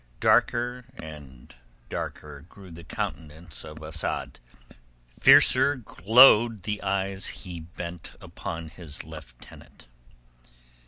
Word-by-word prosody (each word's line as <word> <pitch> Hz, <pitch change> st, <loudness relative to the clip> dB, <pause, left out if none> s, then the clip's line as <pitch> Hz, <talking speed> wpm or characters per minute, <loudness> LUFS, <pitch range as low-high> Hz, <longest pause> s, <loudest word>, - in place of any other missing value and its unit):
Darker 125 Hz, +1 st, +2 dB
and 75 Hz, -5 st, -12 dB, 0.3 s
darker 75 Hz, -2 st, -6 dB
grew 95 Hz, -3 st, -14 dB
the 85 Hz, +1 st, -11 dB
countenance 80 Hz, 0 st, -6 dB
of 75 Hz, 0 st, -10 dB
Asad, 75 Hz, 0 st, -4 dB, 0.8 s
fiercer 145 Hz, -, +6 dB
glowed 115 Hz, -1 st, +5 dB
the 105 Hz, 0 st, -3 dB
eyes 95 Hz, 0 st, -2 dB, 0.2 s
he 90 Hz, -2 st, -7 dB
bent 85 Hz, +1 st, -9 dB
upon 80 Hz, -1 st, -7 dB
his 80 Hz, -2 st, -9 dB
lieutenant. 75 Hz, -7 st, -14 dB
85 Hz, 95 wpm, -26 LUFS, 80-100 Hz, 0.8 s, fiercer